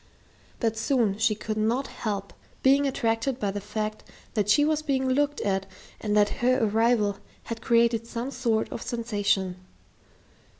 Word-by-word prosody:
But 225 -1 0
soon 225 -4 +1
she 225 -1 +3
could 215 +1 -4
not 230 +5 +1
help 200 -6 -4 0.3
being 275 +1 +5
attracted 240 0 0
by 205 -5 0
the 205 +1 -4
fact 215 +1 -4 0.3
that 210 -3 0
she 290 +8 +5
was 310 0 +1
being 270 -3 0
looked 290 +3 +1
at 195 -1 -1 0.3
and 210 -1 0
that 205 0 +5
her 255 +1 +4
arrival 220 -1 +2 0.2
had 230 -1 -6
created 230 -1 +2
some 235 +3 -4
sort 235 -4 0
of 230 - -5
sensation. 205 -6 -1
225 Hz, 155 wpm, -26 LUFS, 210-255 Hz, 0.3 s, being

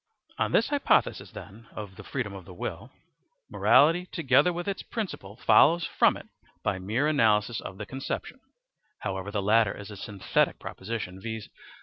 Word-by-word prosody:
On - - +1
the - - +5
hypothesis, 285 -1 +1
then, 110 +3 -11
of 105 -3 -7
freedom 125 -7 -3
of 95 -2 -9
the 90 - -12
will, - - -5 0.6
morality 165 +5 +4
together 160 +1 +3
with 175 +1 -5
its 200 - -2
principle 180 - -5
follows 165 +7 +5
from - - +3
it - - -11 0.4
by 95 - 0
mere 110 +10 0
analysis 110 -6 +2
of 95 - -8
the 105 - -6
conception. 135 +4 -5 0.6
However, 95 -1 -3
the 100 -1 -2
latter 105 0 +3
is 105 +1 -9
a - - -8
synthetic 100 0 0
proposition; 95 -2 -6
viz. 110 0 -5
110 Hz, 155 wpm, -27 LUFS, 100-145 Hz, 0.6 s, the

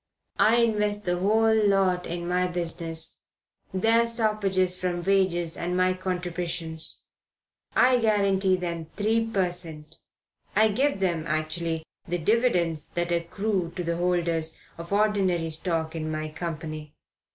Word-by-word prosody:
I 225 - +5
invest 210 -3 +1
the 175 0 0
whole 220 +4 +3
lot 195 -4 +2
in 170 0 -4
my 180 +1 +1
business 165 -2 -2 0.5
their 225 +5 +3
stoppages 210 -5 +1
from 180 -1 -2
wages 180 -4 +1
and 180 +1 -2
my 185 0 +3
contributions. 175 -3 -4 0.7
I 250 0 +5
guarantee 200 -4 +3
them 170 -3 -4
3 225 +2 +1
per 190 -5 +1
cent.; 160 -4 -6 0.6
I 215 +2 +5
give 260 +1 +1
them, 170 -4 0
actually, 160 +1 -2 0.2
the 175 - -1
dividends 175 - +1
that 175 0 -2
accrue 175 +1 -1
to 180 - -3
the 170 0 -1
holders 170 -2 0 0.2
of 170 +2 -8
ordinary 195 -5 +1
stock 160 0 -2
in 155 -1 -3
my 155 0 -3
company. 155 -2 -6
180 Hz, 130 wpm, -26 LUFS, 165-205 Hz, 0.7 s, I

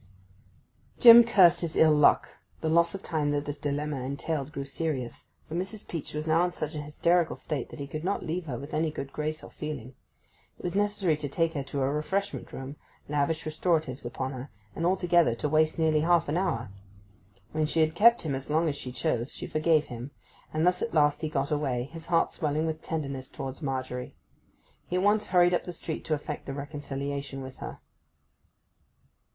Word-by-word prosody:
Jim 235 0 +11
cursed 195 -7 +5
his 165 -2 -3
ill 160 -1 +6
luck; 150 -1 +5 0.3
the 160 - 0
loss 170 +2 +3
of 195 - -7
time 155 -3 0
that 145 0 0
this 145 0 -5
dilemma 145 -1 -2
entailed 140 +2 -3
grew 140 -2 -5
serious; 140 -4 -4 0.2
for - - -8
Mrs. 190 +4 -4
Peach 165 -3 -5
was 150 0 -2
now 165 +2 +3
in - - 0
such 155 -2 -4
a 150 - -4
hysterical 170 +3 +1
state 145 -6 -4
that - - -10
he 140 - -3
could 155 +3 -6
not 195 +3 -1
leave 165 +1 -3
her 125 -4 -3
with 140 +5 -9
any 160 +1 +1
good 140 -2 -6
grace 155 0 -3
or - - -11
feeling. 140 -5 -6 0.6
It - - -15
was 175 - -2
necessary 205 -4 +1
to 145 -1 -4
take 165 +3 0
her 145 - -2
to 135 0 -2
a 135 - +1
refreshment 190 +7 -2
room, 135 +2 -7 0.3
lavish 150 +2 0
restoratives 155 -4 0
upon 130 +2 -4
her, 130 +1 -7 0.3
and 170 - 0
altogether 175 -7 +3
to 135 - -2
waste 155 +1 +2
nearly 160 -2 +3
half 170 +1 +3
an 145 - -1
hour. 165 - -1 0.8
When 155 0 0
she 160 +1 +1
had 155 0 +2
kept 230 +7 +5
him 150 -4 -2
as 135 +1 -5
long 160 +2 +2
as 145 - 0
she 130 -3 -6
chose, 125 -1 -1
she - - -5
forgave 155 -1 +2
him; 120 +2 -7 0.4
and 155 +2 +1
thus 180 0 +2
at 230 - -2
last 145 -1 +3
he 155 - -1
got 140 -1 -1
away, 135 -5 0
his 160 +5 -10
heart 165 -1 +2
swelling 155 0 -1
with 160 0 -3
tenderness 140 -6 -4
towards 135 +3 -6
Margery. 130 -3 -4 0.7
He 180 - -3
at 180 - +1
once 210 +1 +3
hurried 175 -1 +4
up 175 - 0
the 180 - -5
street 165 -2 -5
to 155 - +1
effect 150 0 -6
the 135 - -3
reconciliation 140 -1 -5
with 130 0 -9
her. - - -7
155 Hz, 200 wpm, -28 LUFS, 140-170 Hz, 0.8 s, Jim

